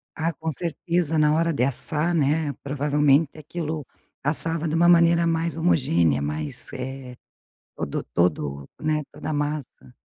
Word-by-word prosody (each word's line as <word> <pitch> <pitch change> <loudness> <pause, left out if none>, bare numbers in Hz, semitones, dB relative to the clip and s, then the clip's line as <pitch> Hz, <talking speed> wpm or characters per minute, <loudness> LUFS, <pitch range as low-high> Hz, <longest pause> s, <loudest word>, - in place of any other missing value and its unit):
Ah, 165 +1 -1
com 160 +2 -4
certeza, 170 +1 -1
na 150 0 +4
hora 165 +1 +1
de 125 - 0
assar, 150 +5 0
né, 150 0 +1
provavelmente 145 +1 +2
aquilo 155 -1 -5 0.4
passava 160 +3 +3
de 155 - -1
uma 170 +1 +4
maneira 170 0 +5
mais 165 0 0
homogênea, 85 - +2
mais, 75 +1 -4
eh 130 -1 -6 0.6
todo 70 - -3
todo, 75 -5 0
né, 155 -1 0
toda 155 - -7
a - - -1
massa. 145 -4 -4
150 Hz, 145 wpm, -24 LUFS, 135-165 Hz, 0.6 s, maneira